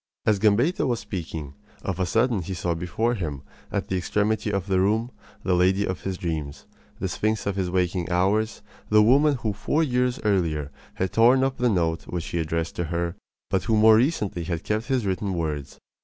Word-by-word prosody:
As 105 -2 +3
Gambetta 115 - +3
was 120 -2 0
speaking, 80 -6 -6 0.3
of 95 -2 -3
a 95 - +1
sudden 115 0 +2
he 95 +3 -5
saw 85 0 -1
before 90 +8 -1
him, 75 - -4 0.3
at - - -2
the 95 - -2
extremity 105 +3 0
of 100 -3 -1
the 95 -2 +1
room, 110 +5 +1 0.3
the 95 - +1
lady 95 +3 +3
of 95 - -4
his 95 -1 -3
dreams, 80 -5 -4 0.3
the - - -2
sphinx 110 0 -1
of 100 -1 -1
his 95 -2 -1
waking 90 -1 0
hours, 105 +5 +1 0.3
the 105 0 +6
woman 140 +6 +5
who 115 -4 -2
four 150 +10 0
years 125 -2 0
earlier 80 -8 0 0.2
had 95 0 -2
torn 125 +4 +5
up 135 0 0
the 125 0 +3
note 85 -5 0
which 85 -2 -4
he 85 - -2
addressed 80 +1 -2
to 85 - -1
her, 85 +1 -2 0.4
but 95 - +1
who 110 -2 +2
more 110 0 +7
recently 110 - 0
had 85 -1 -3
kept 110 +2 -2
his 130 -5 0
written 95 0 -1
words. 75 -5 -3
95 Hz, 200 wpm, -25 LUFS, 85-110 Hz, 0.4 s, more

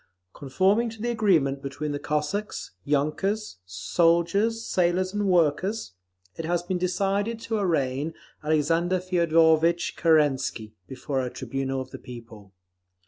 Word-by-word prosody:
Conforming 190 - +1
to 225 0 -11
the 240 +2 -1
agreement 165 -12 +2
between 140 +2 -4
the 145 - -3
Cossacks, 150 - -3
yunkers, 155 - -1
soldiers, 170 - +1
sailors 185 +1 +1
and 205 -1 0
workers, 180 - +1 0.4
it 165 - -5
has 175 +1 0
been 180 0 -2
decided 195 +5 0
to 225 -1 -2
arraign 150 -4 0 0.3
Alexander 165 +4 +1
Feodorvitch 170 -2 +3
Kerensky 140 -9 +1
before 130 +1 -3
a 125 - -3
tribunal 135 +2 -3
of 130 0 -9
the - - -8
people. 115 -5 -11
165 Hz, 125 wpm, -26 LUFS, 140-190 Hz, 0.4 s, Feodorvitch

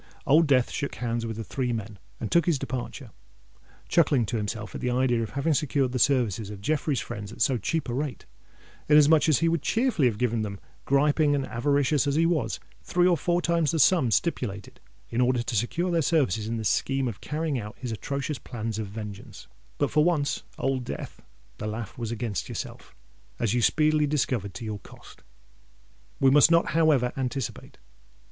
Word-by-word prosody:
Old 155 +3 +5
Death 130 -3 +3
shook 140 - -3
hands 115 -1 -2
with 110 - -4
the 115 - -4
three 125 +3 -2
men, 110 -3 -5 0.2
and 110 - -4
took 170 -1 +3
his 165 -4 +3
departure—chuckling 125 - -3
to 120 - -3
himself 105 0 -4
at - - -6
the 125 - 0
idea 125 -1 +1
of 115 - -3
having 155 +3 +2
secured 135 -2 +1
the 125 - -2
services 115 -6 +1
of 105 -2 -8
Jeffreys' 145 +4 0
friends 105 -3 -6
at - - -12
so 135 - +3
cheap 160 - -2
a 120 - -3
rate, 135 -3 -3 0.6
inasmuch 150 +1 +6
as 155 - +3
he 165 - +3
would 165 -2 +1
cheerfully 225 - +2
have 110 -4 -1
given 120 -1 0
them, 100 -2 -5 0.3
griping 145 +1 +3
and 135 -1 -1
avaricious 140 +3 +1
as 140 - +1
he 165 +2 +3
was, 145 - 0 0.2
three 175 0 +1
or 180 -1 +5
four 175 +3 0
times 170 -3 +2
the 165 - 0
sum 160 -4 +4
stipulated 110 - -2 0.3
in 120 - +1
order 125 -1 +2
to 120 - -3
secure 170 - 0
their 170 -1 +2
services 130 - +1
in 115 +1 -2
the 110 - -4
scheme 135 +6 +1
of 110 -4 -6
carrying 150 -3 -2
out 105 +1 -8
his 125 -3 -5
atrocious 140 +5 -3
plans 115 -2 -5
of 110 - -3
vengeance. 105 -1 -8 0.3
But 145 - 0
for 150 - +4
once, 150 -4 +1 0.2
Old 135 -1 -1
Death! - - -7 0.4
the 105 - -3
laugh 105 -2 -5
was 115 -2 -4
against 110 -3 -3
yourself—as - - -6
you 120 - +1
speedily 155 +3 +3
discovered 125 -9 -1
to 115 - -6
your 105 -1 -4
cost! - - -15 1.0
We 135 -1 +5
must 145 +2 +7
not 170 0 +3
however 155 -7 +3
anticipate. 130 -1 -4
130 Hz, 190 wpm, -26 LUFS, 115-150 Hz, 1.0 s, must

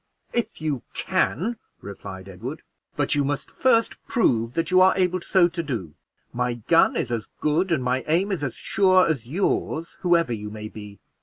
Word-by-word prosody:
"If 235 - -2
you 150 -5 -2
can," 180 - 0 0.2
replied 95 -1 -9
Edward; 115 - -7 0.3
"but 145 -2 0
you 145 - +2
must 145 +1 -3
first 230 -3 +2
prove 115 - +1
that 165 +2 -1
you 185 0 +6
are 190 0 +5
able 185 -1 +1
so 180 0 +4
to 170 0 -3
do; 115 - -4 0.4
my 125 0 -1
gun 165 +9 +3
is 120 - -1
as 115 -2 -2
good 165 +5 +1
and 150 -6 +1
my 125 +1 0
aim 180 +6 +2
is 180 -6 -2
as 135 - -3
sure 185 -2 +3
as 135 -8 -1
yours, 165 0 -1
whoever 170 -7 +3
you 105 -1 -5
may 105 0 -7
be. 105 -2 -10
150 Hz, 180 wpm, -24 LUFS, 115-180 Hz, 0.4 s, you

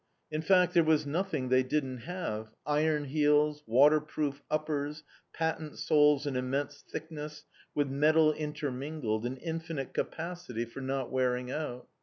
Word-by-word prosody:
In 155 0 -1
fact 180 0 +4
there 170 - +6
was 155 -1 +3
nothing 155 -4 -1
they 130 0 +5
didn't 130 -1 -1
have, 115 -9 -4 0.2
iron 150 0 +2
heels, 150 +1 +3
waterproof 145 +3 +3
uppers, 150 0 -2 0.3
patent 160 -2 -2
soles 150 -1 +4
an 140 -2 -2
immense 140 +3 -2
thickness, 150 -1 -7 0.3
with 145 -1 +2
metal 155 +3 +4
intermingled, 145 -6 -3
an 130 +2 -5
infinite 165 -2 -4
capacity 165 -9 -3
for 120 +4 -9
not 135 -1 -2
wearing 125 -1 0
out. 130 -5 -4
150 Hz, 135 wpm, -31 LUFS, 130-155 Hz, 0.3 s, there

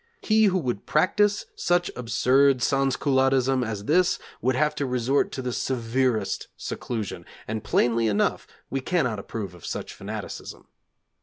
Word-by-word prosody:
He 220 0 +4
who 190 -2 +3
would 125 - -3
practise 205 +6 +2
such 175 0 +1
absurd 125 +3 +3
sansculottism 135 -1 +2
as 105 -3 -4
this 180 +6 +3 0.2
would 130 +1 +1
have 150 +2 +2
to 140 - -1
resort 125 +2 +1
to 130 - -4
the 125 -1 -2
severest 125 -1 -1
seclusion, 105 -7 -4 0.2
and 110 0 -3
plainly 115 -1 +2
enough 105 -1 0 0.2
we 135 - -1
cannot 130 - 0
approve 100 -2 -6
of 90 - -15
such - - -5
fanaticism. - - -7
130 Hz, 140 wpm, -25 LUFS, 115-145 Hz, 0.2 s, He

